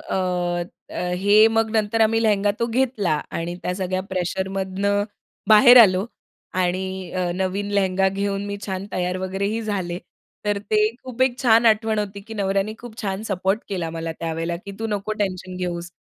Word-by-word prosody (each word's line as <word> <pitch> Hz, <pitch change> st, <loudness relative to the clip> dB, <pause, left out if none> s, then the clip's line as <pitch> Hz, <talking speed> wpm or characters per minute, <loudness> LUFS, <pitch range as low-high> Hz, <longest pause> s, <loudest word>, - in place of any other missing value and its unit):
अ, -, -, -5 dB, 0.8 s
अ, 180 Hz, 0 st, -2 dB
हे 210 Hz, +2 st, +6 dB
मग 225 Hz, 0 st, +1 dB
नंतर 220 Hz, +1 st, +1 dB
आम्ही 225 Hz, +1 st, +3 dB
लेहेंगा 205 Hz, -2 st, +3 dB
तो 235 Hz, -, +2 dB
घेतला 235 Hz, -6 st, 0 dB, 0.2 s
आणि 170 Hz, +1 st, -3 dB
त्या 180 Hz, -, -2 dB
सगळ्या 185 Hz, 0 st, -2 dB
प्रेशरमधनं 190 Hz, +2 st, -1 dB, 0.4 s
बाहेर 235 Hz, +3 st, +8 dB
आलो 190 Hz, -1 st, +3 dB, 0.5 s
आणि 185 Hz, 0 st, -2 dB
अ, 180 Hz, -1 st, -1 dB
नवीन 190 Hz, +2 st, -2 dB
लेहेंगा 190 Hz, -1 st, +2 dB
घेऊन 200 Hz, +1 st, -2 dB
मी 200 Hz, 0 st, -4 dB
छान 190 Hz, 0 st, -4 dB
तयार 180 Hz, 0 st, -1 dB
वगैरेही 195 Hz, +4 st, -2 dB
झाले. 190 Hz, -5 st, -2 dB, 0.5 s
तर 205 Hz, -1 st, +1 dB
ते 210 Hz, +1 st, 0 dB, 0.2 s
खूप 255 Hz, -1 st, -2 dB
एक 260 Hz, -1 st, +1 dB
छान 230 Hz, -1 st, +5 dB
आठवण 220 Hz, 0 st, +3 dB
होती, 200 Hz, -1 st, -3 dB
की 220 Hz, +3 st, -10 dB
नवऱ्याने 200 Hz, +1 st, 0 dB
खूप 235 Hz, -2 st, -10 dB
छान 195 Hz, 0 st, -2 dB
सपोर्ट 195 Hz, 0 st, 0 dB
केला 175 Hz, -5 st, -3 dB
मला 165 Hz, 0 st, -4 dB
त्यावेळेला 165 Hz, +1 st, -2 dB
की 200 Hz, -, -7 dB
"तू 225 Hz, -, -2 dB
नको 210 Hz, 0 st, -2 dB
टेन्शन 185 Hz, -2 st, -3 dB
घेऊस. 175 Hz, -1 st, -4 dB
195 Hz, 170 wpm, -22 LUFS, 185-215 Hz, 0.8 s, बाहेर